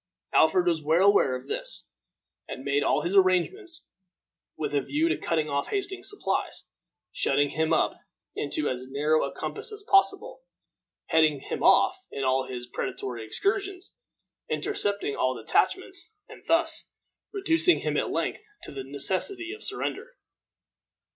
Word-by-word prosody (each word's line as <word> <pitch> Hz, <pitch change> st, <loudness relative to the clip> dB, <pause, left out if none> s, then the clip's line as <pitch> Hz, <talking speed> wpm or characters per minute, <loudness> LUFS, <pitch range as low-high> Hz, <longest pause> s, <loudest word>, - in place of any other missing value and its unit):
Alfred 165 Hz, +3 st, +5 dB
was 165 Hz, -3 st, +1 dB
well 165 Hz, +6 st, +4 dB
aware 135 Hz, -10 st, +3 dB
of 125 Hz, -, -7 dB
this, -, -, -4 dB, 0.6 s
and 130 Hz, -, -7 dB
made 140 Hz, +1 st, +2 dB
all -, -, +2 dB
his 175 Hz, +4 st, -1 dB
arrangements 200 Hz, -, +2 dB, 0.7 s
with 150 Hz, -, -3 dB
a 145 Hz, -, +2 dB
view 305 Hz, -, 0 dB
to -, -, +2 dB
cutting 155 Hz, -2 st, -1 dB
off 140 Hz, -1 st, -1 dB
Hastings's 390 Hz, -2 st, -2 dB
supplies, 410 Hz, -, -2 dB, 0.5 s
shutting 145 Hz, 0 st, +2 dB
him 160 Hz, 0 st, 0 dB
up -, -, +3 dB, 0.4 s
into 145 Hz, +1 st, -2 dB
as 130 Hz, 0 st, -3 dB
narrow 150 Hz, +3 st, +2 dB
a -, -, -2 dB
compass 445 Hz, +2 st, -5 dB
as 420 Hz, 0 st, -7 dB
possible, 395 Hz, +2 st, +3 dB, 0.7 s
heading 155 Hz, -3 st, +4 dB
him -, -, -5 dB
off 375 Hz, 0 st, +4 dB
in 135 Hz, -, -4 dB
all 130 Hz, 0 st, +1 dB
his 125 Hz, -1 st, -6 dB
predatory 120 Hz, -1 st, -4 dB
excursions, 390 Hz, -, -2 dB, 0.5 s
intercepting 205 Hz, -, -1 dB
all 130 Hz, 0 st, +1 dB
detachments, 420 Hz, -, 0 dB, 0.2 s
and -, -, -13 dB
thus 330 Hz, 0 st, +1 dB, 0.4 s
reducing 360 Hz, -3 st, +3 dB
him -, -, -1 dB
at -, -, 0 dB
length -, -, -2 dB, 0.2 s
to -, -, -9 dB
the 135 Hz, -1 st, -6 dB
necessity 190 Hz, -, -2 dB
of 430 Hz, -, -10 dB
surrender. -, -, -3 dB
175 Hz, 145 wpm, -27 LUFS, -, 0.7 s, Alfred